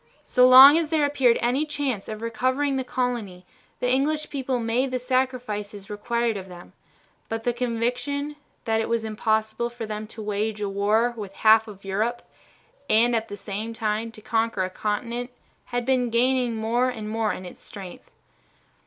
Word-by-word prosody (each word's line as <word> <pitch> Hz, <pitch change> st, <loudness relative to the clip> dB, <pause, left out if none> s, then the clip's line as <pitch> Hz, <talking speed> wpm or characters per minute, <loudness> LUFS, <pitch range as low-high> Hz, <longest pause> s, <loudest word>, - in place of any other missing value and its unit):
So 250 Hz, 0 st, +4 dB
long 270 Hz, +5 st, +10 dB
as 320 Hz, -3 st, -2 dB
there 310 Hz, -2 st, +2 dB
appeared 265 Hz, -5 st, +3 dB
any 250 Hz, +5 st, +1 dB
chance 280 Hz, -8 st, -3 dB
of 215 Hz, +1 st, -6 dB
recovering 260 Hz, +5 st, 0 dB
the 260 Hz, -, -1 dB
colony 235 Hz, -8 st, -3 dB, 0.3 s
the 250 Hz, -, 0 dB
English 300 Hz, +4 st, 0 dB
people 265 Hz, -2 st, -1 dB
made 235 Hz, +3 st, 0 dB
the 255 Hz, -, -1 dB
sacrifices 245 Hz, -6 st, -2 dB
required 230 Hz, +1 st, -1 dB
of 190 Hz, -1 st, -8 dB
them, 175 Hz, -1 st, -12 dB, 0.6 s
but 225 Hz, 0 st, -3 dB
the 245 Hz, -, +1 dB
conviction 250 Hz, +5 st, -2 dB, 0.3 s
that 225 Hz, 0 st, +1 dB
it -, -, -3 dB
was 230 Hz, -1 st, 0 dB
impossible 220 Hz, +1 st, -1 dB
for 240 Hz, -1 st, -6 dB
them 215 Hz, 0 st, -5 dB
to 220 Hz, 0 st, -9 dB
wage 210 Hz, +1 st, -2 dB
a 205 Hz, -, -2 dB
war 210 Hz, +4 st, +1 dB
with 200 Hz, -3 st, -8 dB
half 220 Hz, +1 st, +7 dB
of 200 Hz, -2 st, -12 dB
Europe 220 Hz, +5 st, -1 dB, 0.7 s
and 235 Hz, +2 st, +4 dB
at 225 Hz, 0 st, -1 dB
the 205 Hz, -2 st, -7 dB
same 215 Hz, +3 st, -5 dB
time 220 Hz, +1 st, -2 dB
to 215 Hz, -, -13 dB
conquer 225 Hz, -3 st, 0 dB
a 185 Hz, -, -3 dB
continent 235 Hz, +5 st, -3 dB, 0.4 s
had 245 Hz, -1 st, -3 dB
been 255 Hz, -2 st, +2 dB
gaining 245 Hz, 0 st, +2 dB
more 235 Hz, +3 st, +1 dB
and 220 Hz, -4 st, -6 dB
more 220 Hz, 0 st, 0 dB
in 185 Hz, -1 st, -7 dB
strength. 195 Hz, -, -10 dB
230 Hz, 170 wpm, -25 LUFS, 215-255 Hz, 0.7 s, long